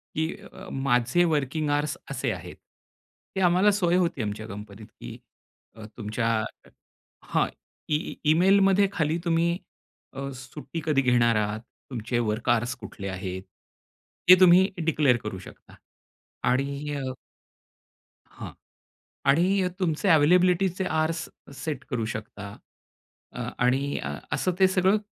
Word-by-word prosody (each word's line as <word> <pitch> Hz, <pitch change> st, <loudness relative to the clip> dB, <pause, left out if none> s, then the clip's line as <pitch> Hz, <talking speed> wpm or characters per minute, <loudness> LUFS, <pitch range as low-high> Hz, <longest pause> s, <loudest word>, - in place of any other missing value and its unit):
की 160 Hz, +2 st, -1 dB, 0.2 s
अ, 190 Hz, 0 st, -10 dB
माझे 135 Hz, +3 st, +2 dB
working 150 Hz, -1 st, 0 dB
hours 145 Hz, +1 st, 0 dB
असे -, -, -1 dB
आहेत. -, -, -7 dB, 0.8 s
ती -, -, -1 dB
आम्हाला 185 Hz, +3 st, +4 dB
सोय 180 Hz, -4 st, +1 dB
होती 170 Hz, -7 st, 0 dB
आमच्या 105 Hz, 0 st, -4 dB
कंपनीत 105 Hz, +1 st, -9 dB
की -, -, -10 dB, 0.8 s
तुमच्या 110 Hz, +1 st, -2 dB, 1.0 s
हां. -, -, +1 dB, 0.4 s
ई 150 Hz, 0 st, -1 dB, 0.2 s
ईमेलमध्ये 195 Hz, +3 st, +4 dB
खाली 160 Hz, -2 st, 0 dB
तुम्ही 170 Hz, +1 st, +2 dB, 0.6 s
अ, 135 Hz, 0 st, -5 dB
सुट्टी 145 Hz, +5 st, -7 dB
कधी 150 Hz, -4 st, +3 dB
घेणार 120 Hz, -3 st, +3 dB
आहात? 105 Hz, 0 st, 0 dB, 0.3 s
तुमचे 120 Hz, 0 st, -2 dB
वर्क 115 Hz, +1 st, -1 dB
अवर्स 120 Hz, +1 st, +1 dB
कुठले 105 Hz, -4 st, -8 dB
आहेत? 95 Hz, 0 st, -5 dB, 0.9 s
हे 185 Hz, 0 st, +10 dB
तुम्ही 185 Hz, +1 st, +7 dB, 0.2 s
डिक्लीअर 150 Hz, -6 st, +3 dB
करू 105 Hz, -3 st, -5 dB
शकता. -, -, -14 dB, 0.7 s
आणि 140 Hz, +3 st, -1 dB
अ, 135 Hz, -2 st, -3 dB, 1.2 s
हां. -, -, -8 dB, 0.7 s
आणि 180 Hz, +7 st, +3 dB
तुमचे 180 Hz, +1 st, 0 dB
अवेलेबिलिटीचे 180 Hz, +4 st, +4 dB
अवर्स 160 Hz, 0 st, -1 dB, 0.4 s
सेट 155 Hz, -2 st, -3 dB
करू 120 Hz, -5 st, -1 dB
शकता, 105 Hz, -2 st, -8 dB, 0.8 s
अ, -, -, -5 dB, 0.2 s
आणि 135 Hz, +3 st, +1 dB, 0.3 s
असं 150 Hz, +6 st, 0 dB
ते 190 Hz, -, +7 dB
सगळं 185 Hz, +2 st, +3 dB
145 Hz, 120 wpm, -26 LUFS, 120-175 Hz, 1.2 s, हे